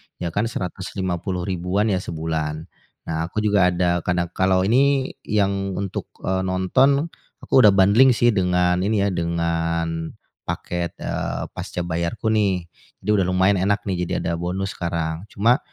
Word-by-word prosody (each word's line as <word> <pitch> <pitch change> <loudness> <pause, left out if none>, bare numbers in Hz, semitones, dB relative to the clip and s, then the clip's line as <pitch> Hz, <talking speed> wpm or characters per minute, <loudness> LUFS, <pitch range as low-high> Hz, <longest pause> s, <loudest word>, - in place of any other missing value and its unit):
ya 85 -2 -4
kan 105 +5 0
Rp150.000-an 95 0 -2
ya 95 - +1
sebulan. 80 -2 -3 0.4
Nah, 80 0 -2
aku 105 +4 -3
juga 100 -3 +4
ada, 90 -1 +1
kadang 85 0 -1
kalau 95 0 +2
ini 135 +5 +3 0.2
yang 100 -2 0
untuk, 100 -1 -4 0.2
eee, 95 0 0
nonton, 135 - +2 0.3
aku - - -9
udah 105 -5 +8
bundling 110 +7 +6
sih 120 +1 +4
dengan 90 -2 +2
ini 100 +1 +1
ya, 100 - +2
dengan 85 -1 -1 0.3
paket, 85 -1 -3
eee, - - -3
pascabayarku 90 +5 -3
nih. 100 -5 +1 0.4
Jadi - - -5
udah 100 -3 +3
lumayan 95 +1 +3
enak 100 +2 +1
nih, 90 -3 -2
jadi - - -2
ada 85 0 -2
bonus 95 +3 -2
sekarang. 85 +1 -3
Cuma 115 +7 +2
95 Hz, 145 wpm, -22 LUFS, 85-100 Hz, 0.4 s, udah